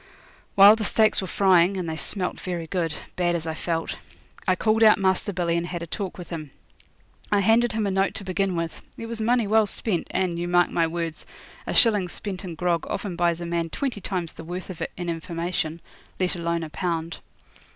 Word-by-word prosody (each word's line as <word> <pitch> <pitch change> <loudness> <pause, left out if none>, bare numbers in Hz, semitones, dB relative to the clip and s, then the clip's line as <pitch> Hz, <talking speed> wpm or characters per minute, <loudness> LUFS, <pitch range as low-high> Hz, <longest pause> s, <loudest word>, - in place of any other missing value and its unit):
While 200 +2 +9
the 220 - -3
steaks 215 0 +3
were 190 - -4
frying 190 0 +4
and 180 -2 -3
they 160 - -3
smelt 180 +3 -3
very 175 -3 -4
good, 165 -2 -2 0.2
bad 175 -1 +1
as 165 -1 -3
I 160 - -2
felt 165 0 -3 0.5
I 185 - +4
called 220 +4 +1
out 215 -1 +7
Master 190 +1 +1
Billy 175 -2 0
and 170 0 -1
had 175 -1 -4
a - - -4
talk 190 +2 -5
with 180 -1 -9
him. 155 -3 -5 0.8
I 205 -1 +4
handed 225 +4 +3
him 220 -1 0
a 200 - 0
note 195 +1 +1
to 200 - -6
begin 190 0 -1
with. 165 -1 -3 0.2
It 230 - -6
was 225 -1 -4
money 235 +1 +2
well 215 +1 +3
spent, 195 -3 -1
and, 175 -2 -1
you 175 - -2
mark 175 0 +3
my 165 -1 +2
words, 165 -1 -4 0.4
a - - -1
shilling 210 -6 +5
spent 195 0 -5
in 175 -3 -6
grog 170 0 0
often 195 -4 -3
buys 170 0 +1
a - - -3
man 170 -1 -1
twenty 250 - -3
times 180 -4 -3
the - - -10
worth 180 +3 -6
of 175 - -10
it - - -3
in 175 -1 -4
information, 165 0 -3 0.4
let 185 -1 0
alone 170 -1 -1
a 155 - -7
pound. 165 -2 -3
180 Hz, 215 wpm, -25 LUFS, 170-200 Hz, 0.8 s, While